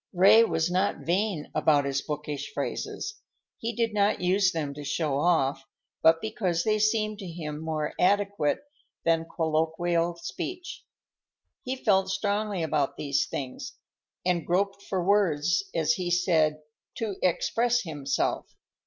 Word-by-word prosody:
Ray 195 +5 +7
was 165 -4 0
not 185 +3 0
vain 180 -2 -1
about 150 -2 +3
his 140 0 -1
bookish 150 -1 -5
phrases. 420 0 -4 0.4
He 230 0 -3
did 230 -1 0
not 205 0 +2
use 185 +1 +3
them 150 -4 -3
to 145 +1 -8
show 145 -1 -1
off, 145 -5 +2 0.4
but 165 0 +5
because 185 -6 -1
they 215 -1 +1
seemed 215 -1 +1
to 195 - -6
him 155 -3 -6
more 155 -1 -3
adequate 200 - +2 0.4
than 165 0 +2
colloquial 165 +1 0
speech. 355 - -6 0.8
He 260 +1 -2
felt 195 -6 +2
strongly 200 -1 -1
about 150 -3 0
these 145 0 0
things, 130 -2 -5 0.5
and 180 -2 +1
groped 195 +4 0
for 190 -3 -2
words, 185 - +2
as - - +3
he 180 -6 -3
said, 160 -4 +2 0.3
"to 210 -4 -3
express 235 +7 +2
himself." 145 -5 -2
175 Hz, 135 wpm, -27 LUFS, 155-205 Hz, 0.8 s, Ray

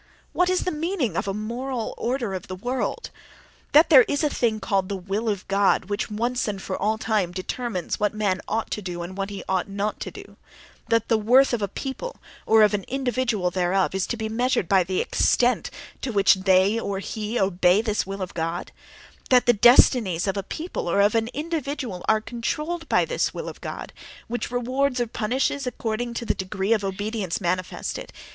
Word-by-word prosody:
What 360 0 +2
is 370 0 +2
the 365 - -1
meaning 310 - -1
of 190 - -1
a - - 0
"moral 235 +3 -4
order 240 -4 -2
of 185 -2 -5
the 185 - -5
world"? 245 +7 -3 0.6
That 310 +3 +6
there 270 -4 +10
is 285 +2 0
a 300 - +2
thing 220 -3 0
called 195 -2 0
the 200 - -2
will 195 +4 -2
of 200 -3 -3
God 195 0 +2
which, 205 - -1
once 240 +4 -1
and 200 -2 -3
for 190 0 -4
all 215 +2 0
time, 215 -5 0
determines 185 +1 -3
what 210 0 +2
man 205 -3 -1
ought 225 +1 -2
to 210 - -2
do 175 -3 -5
and 180 +2 -7
what 195 0 -3
he 200 -1 -6
ought 190 0 0
not 200 +2 -2
to - - -4
do; - - -12 0.5
that 230 -1 +2
the 225 - +3
worth 250 +5 +5
of 235 - 0
a 200 - 0
people, 270 - -5 0.3
or 220 -1 +6
of 210 - +4
an 200 -2 -1
individual 245 -7 0
thereof, 185 +1 +1
is 190 -1 -1
to 235 - -3
be 220 0 -3
measured 240 -3 0
by 190 0 +4
the 185 +1 -1
extent 245 0 +2 0.3
to 255 - -2
which 200 -3 +5
they 190 +3 +3
or 200 -3 -3
he 215 +3 -3
obey 185 0 +3
this 215 -1 0
will 195 0 -4
of 185 - -7
God; 165 +1 -3 0.6
that 250 -1 +5
the 240 - +6
destinies 220 -5 +5
of 195 -1 -1
a 200 - -1
people 315 - -5
or 200 - +2
of 205 +1 +4
an 225 -1 +1
individual 285 - -4
are 220 0 +4
controlled 300 +9 -3
by - - +3
this - - -1
will - - -5
of - - -8
God, - - -6 0.3
which 240 +1 -3
rewards 255 +2 0
or 240 - +2
punishes 255 +5 -1
according 235 0 -3
to 235 - -3
the - - +1
degree 190 +2 -1
of 215 -2 0
obedience 195 -1 -2
manifested. 185 -1 -3
215 Hz, 205 wpm, -24 LUFS, 195-245 Hz, 0.6 s, there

